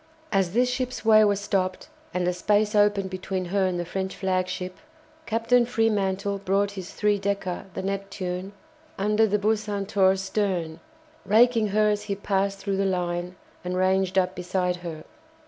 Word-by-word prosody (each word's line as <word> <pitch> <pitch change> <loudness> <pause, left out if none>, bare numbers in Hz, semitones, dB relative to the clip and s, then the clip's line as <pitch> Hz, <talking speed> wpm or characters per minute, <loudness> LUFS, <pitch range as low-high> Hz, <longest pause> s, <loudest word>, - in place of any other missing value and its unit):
As 190 -3 +1
this 250 +3 +3
ship's 250 -1 -3
way 215 -1 +7
was 205 -1 +2
stopped, 185 -2 -1 0.2
and 180 0 -1
a 180 - +1
space 210 +4 +1
opened 205 -2 +2
between 185 0 -3
her 190 +1 +1
and 180 -1 -2
the 175 - -2
French 190 +2 -4
flagship, 185 -1 -2 0.5
Captain 230 +2 +3
Fremantle 200 -4 0
brought 200 +1 +1
his 190 -2 -7
three 210 -1 +1
decker, 195 -2 -2
the - - -3
"Neptune," 195 -1 -4 0.5
under 210 +2 +3
the 210 0 +1
"Bucentaure's" 200 -2 +1
stern, 185 -5 -1 0.4
raking 225 +1 +4
her 210 +1 +2
as 205 0 -1
he 200 -1 -2
passed 195 0 -1
through 195 0 -2
the 195 - +1
line 180 -1 -2 0.3
and 180 0 -3
ranged 190 0 +1
up 185 0 +2
beside 180 0 -1
her. 165 -3 -7
195 Hz, 160 wpm, -25 LUFS, 185-210 Hz, 0.5 s, way